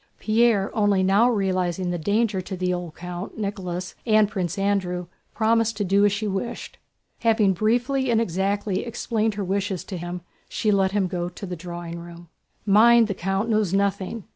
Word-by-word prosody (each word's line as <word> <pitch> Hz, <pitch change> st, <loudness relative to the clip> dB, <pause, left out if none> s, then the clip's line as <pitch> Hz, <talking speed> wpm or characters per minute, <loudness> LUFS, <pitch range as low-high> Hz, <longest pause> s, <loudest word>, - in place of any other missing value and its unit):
Pierre—only 210 Hz, -3 st, +2 dB
now 200 Hz, +6 st, +4 dB
realizing 185 Hz, -4 st, 0 dB
the 175 Hz, -, -2 dB
danger 205 Hz, +2 st, +1 dB
to 190 Hz, +1 st, -6 dB
the 180 Hz, 0 st, 0 dB
old 175 Hz, -3 st, -5 dB
count, 180 Hz, +4 st, -7 dB
Nicholas, 185 Hz, -4 st, -4 dB
and 215 Hz, -2 st, +4 dB
Prince 185 Hz, -5 st, -3 dB
Andrew—promised 200 Hz, +4 st, -1 dB
to 205 Hz, -, 0 dB
do 200 Hz, +1 st, +3 dB
as 205 Hz, -, +4 dB
she 205 Hz, +2 st, -2 dB
wished. 200 Hz, +4 st, -4 dB, 0.4 s
Having 220 Hz, -4 st, +3 dB
briefly 245 Hz, +7 st, +1 dB
and 230 Hz, -2 st, +3 dB
exactly 195 Hz, 0 st, -1 dB
explained 225 Hz, -2 st, -1 dB
her 205 Hz, -, -2 dB
wishes 195 Hz, -1 st, -2 dB
to 185 Hz, -, -6 dB
him, 175 Hz, +1 st, -5 dB, 0.3 s
she 215 Hz, -, 0 dB
let 195 Hz, -2 st, +2 dB
him 205 Hz, -2 st, +2 dB
go 175 Hz, -1 st, -3 dB
to 180 Hz, +3 st, -9 dB
the 180 Hz, -1 st, -5 dB
drawing 170 Hz, 0 st, -7 dB
room. 170 Hz, 0 st, -11 dB, 0.4 s
"Mind, 225 Hz, +2 st, +6 dB
the -, -, 0 dB
count 195 Hz, +3 st, -1 dB
knows 215 Hz, -5 st, +1 dB
nothing. 200 Hz, +2 st, -1 dB
195 Hz, 165 wpm, -24 LUFS, 180-215 Hz, 0.4 s, Mind